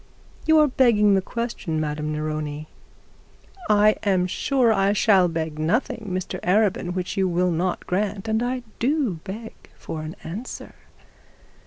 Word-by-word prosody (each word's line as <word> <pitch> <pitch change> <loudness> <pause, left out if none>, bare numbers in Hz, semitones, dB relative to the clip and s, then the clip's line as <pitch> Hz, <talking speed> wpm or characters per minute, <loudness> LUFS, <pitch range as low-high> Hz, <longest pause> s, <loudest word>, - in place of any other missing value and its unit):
'You 315 0 +6
are 305 -1 +6
begging 230 -6 +4
the 190 - +3
question, 215 -7 -3
Madame 150 0 -2
Neroni.' 155 0 -3 1.0
'I 210 0 +5
am 190 -3 +2
sure 250 +6 +1
that 220 - +3
I 195 +1 +3
shall 195 -3 +4
beg 160 -2 -3
nothing, 220 - -1
Mr 185 0 -3
Arabin, 190 -1 +1
which 185 +2 -3
you 190 -1 +2
will 180 0 +1
not 175 +2 -1
grant, 200 +2 -2
and 220 +1 +1
I 250 +1 -2 0.2
do 255 - 0
beg 220 +4 -7 0.2
for 155 - -6
an 155 +1 -7
answer. 195 +10 -7
195 Hz, 150 wpm, -23 LUFS, 170-225 Hz, 1.0 s, You